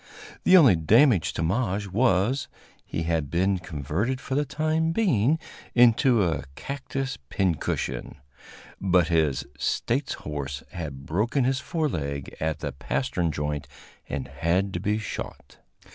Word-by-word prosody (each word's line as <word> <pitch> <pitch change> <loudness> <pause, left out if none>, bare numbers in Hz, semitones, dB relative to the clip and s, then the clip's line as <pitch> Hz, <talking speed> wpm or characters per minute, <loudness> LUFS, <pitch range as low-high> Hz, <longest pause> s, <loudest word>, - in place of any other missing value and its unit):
The 185 - +8
only 135 - +7
damage 105 - +4
to 85 - -2
Maje 100 +2 0
was, 115 +4 +1 0.4
he 85 - -3
had 80 -3 -1
been 95 +3 +1
converted 90 - -2
for 135 - -5
the 145 +2 +1
time 155 +3 0
being 155 - +2 0.4
into 120 -1 +5
a 80 -4 -1
cactus 135 - -4
pincushion; 80 -9 -1 0.7
but 90 -3 +3
his 75 -6 +1
"States" 135 +4 0
horse 70 -2 -5
had 70 -5 -6
broken 110 - +1
his 130 +1 +1
fore 160 0 -1
leg 70 - -4
at 80 -1 -2
the 75 - -2
pastern 85 - -1
joint 75 -1 -3 0.4
and 70 -3 -3
had 85 +9 0
to 85 - -2
be 105 +3 0
shot. 105 -9 -7
95 Hz, 135 wpm, -26 LUFS, 80-130 Hz, 0.7 s, The